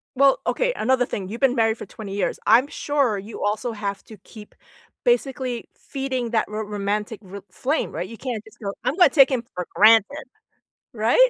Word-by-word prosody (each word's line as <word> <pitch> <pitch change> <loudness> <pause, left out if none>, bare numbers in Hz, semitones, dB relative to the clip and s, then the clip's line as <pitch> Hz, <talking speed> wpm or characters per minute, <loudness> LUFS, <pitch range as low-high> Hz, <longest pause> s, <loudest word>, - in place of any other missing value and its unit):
Well, 275 +1 +4
okay, - - +1
another 250 +1 +1
thing, 190 -2 -5
you've 230 +5 -7
been 265 -2 +3
married 225 -1 +2
for - - -7
20 200 -1 -8
years. 205 - -1
I'm 235 +6 +6
sure 280 -8 0
you 210 +3 -8
also 215 +3 -1
have 200 -2 -4
to 220 - -12
keep, 210 +2 -14 0.5
basically, 265 - 0
feeding 260 -4 -4
that 225 -2 +1
ro 215 +1 -4
romantic 210 +1 -3
r 195 +1 -9
flame, 280 - -1
right? 175 +3 -4
You 230 - -9
can't 240 -5 -4
just 220 +2 -18
go, 200 -1 -3
"I'm 275 - 0
gonna 360 - +6
take 275 -3 +6
him 250 -3 0
for 180 -1 -4
granted," 225 +7 +5 0.7
right? 235 - +4
225 Hz, 190 wpm, -23 LUFS, 210-265 Hz, 0.7 s, I'm